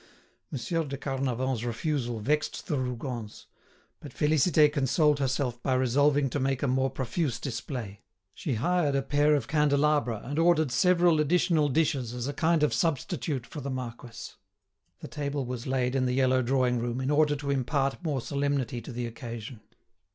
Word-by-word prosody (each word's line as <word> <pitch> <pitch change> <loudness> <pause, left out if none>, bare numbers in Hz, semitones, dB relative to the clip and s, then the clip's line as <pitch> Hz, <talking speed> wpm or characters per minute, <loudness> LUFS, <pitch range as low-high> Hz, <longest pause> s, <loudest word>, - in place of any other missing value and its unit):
Monsieur 155 +5 -2
de 140 -2 -5
Carnavant's 130 -3 -2
refusal 120 -1 -2
vexed 150 +7 -1
the 145 - -1
Rougons; 125 -3 -5 0.5
but 145 - -10
Félicité 150 +1 +3
consoled 150 +1 +2
herself 130 -3 -1
by 130 0 +1
resolving 140 +3 +3
to 140 +3 -2
make 135 0 -1
a - - +2
more 130 +1 +1
profuse 130 0 -2
display. 115 -6 -5 0.3
She 135 +3 -3
hired 150 +3 +1
a 135 - +1
pair 145 +2 +3
of 135 -5 -2
candelabra 145 -6 +2
and 145 +4 -3
ordered 165 -4 +3
several 175 +2 +4
additional 155 -1 +2
dishes 135 -5 0
as 125 +1 -3
a 145 - -3
kind 160 0 +2
of 150 - +2
substitute 150 -4 -1
for 150 - -8
the 140 - -4
marquis. 120 -3 -6 0.7
The - - -7
table 140 -2 -3
was 125 0 -5
laid 130 -1 0
in 130 -1 +1
the 125 - 0
yellow 130 -1 +3
drawing 125 -1 +1
room, 120 +1 -2
in 130 +2 -1
order 150 0 +3
to 140 -1 -3
impart 135 +3 0
more 145 -6 -1
solemnity 140 -3 -1
to 115 - -9
the 120 0 -3
occasion. 115 -1 -7
135 Hz, 165 wpm, -28 LUFS, 125-150 Hz, 0.7 s, several